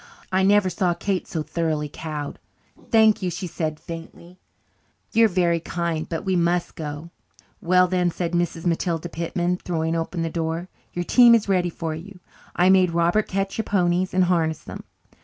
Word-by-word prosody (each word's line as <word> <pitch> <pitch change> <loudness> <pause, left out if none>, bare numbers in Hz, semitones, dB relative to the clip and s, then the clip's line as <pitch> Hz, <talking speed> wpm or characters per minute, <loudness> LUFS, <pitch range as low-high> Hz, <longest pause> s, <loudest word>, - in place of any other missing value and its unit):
I 190 0 +2
never 200 0 +4
saw 180 -1 0
Kate 190 +1 -2
so 160 -2 -3
thoroughly 155 -2 -2
cowed. 150 -1 -6 0.5
"Thank 220 -2 +5
you," 185 - -1
she 175 +2 -5
said 155 -2 -3
faintly. 170 +1 -10 0.7
"You 230 0 +5
are - - +6
very 175 -3 +1
kind, 165 -1 -3
but 165 +3 -4
we 190 -1 +1
must 175 0 +1
go." 150 +1 -7 0.5
"Well, 180 +1 +4
then," 180 -1 +1
said 170 0 -3
Mrs. 175 -1 -1
Matilda 170 0 -1
Pitman, 175 +2 -2
throwing 165 -2 -2
open 165 +1 -2
the 165 - -1
door, 165 +2 -3 0.2
"your 175 0 -3
team 240 +2 +7
is 220 -2 0
ready 180 -3 +2
for 165 -1 -4
you. 180 +4 -9 0.4
I 180 - +3
made 185 -3 +4
Robert 170 +5 +2
catch 195 +2 -2
your 220 - -1
ponies 180 -1 +1
and 185 0 +3
harness 165 -3 0
them. - - -9
175 Hz, 175 wpm, -23 LUFS, 165-185 Hz, 0.7 s, team